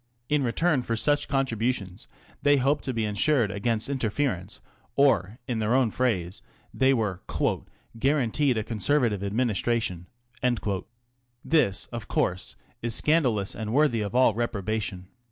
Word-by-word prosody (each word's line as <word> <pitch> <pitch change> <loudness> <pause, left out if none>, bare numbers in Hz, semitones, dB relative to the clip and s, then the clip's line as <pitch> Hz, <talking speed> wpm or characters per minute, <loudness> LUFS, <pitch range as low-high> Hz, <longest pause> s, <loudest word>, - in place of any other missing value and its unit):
In 150 -1 +2
return 140 +4 +1
for 115 -1 -2
such 145 +6 +2
contributions 115 -8 -1 0.3
they 145 0 +4
hoped 140 +3 +1
to 130 - -1
be 115 -3 -1
insured 105 +2 +2
against 110 +2 -1
interference, 110 -7 -2 0.4
or, 115 -7 +3
in 120 -4 -1
their 110 +3 +1
own 130 -4 +3
phrase, 100 -8 -1 0.3
they 130 0 +3
were 105 -8 0 0.4
" 115 - -21
guaranteed 135 -1 +2
a 110 - 0
Conservative 115 -1 0
Administration." 105 -4 -1 1.4
This, 150 -12 +2
of 115 -4 -6
course, 90 0 -1 0.3
is 115 -1 0
scandalous 125 -11 +2
and 110 0 -4
worthy 140 -5 +3
of 105 +3 -4
all 125 -3 +5
reprobation. 105 -4 -3
115 Hz, 135 wpm, -26 LUFS, 105-135 Hz, 1.4 s, all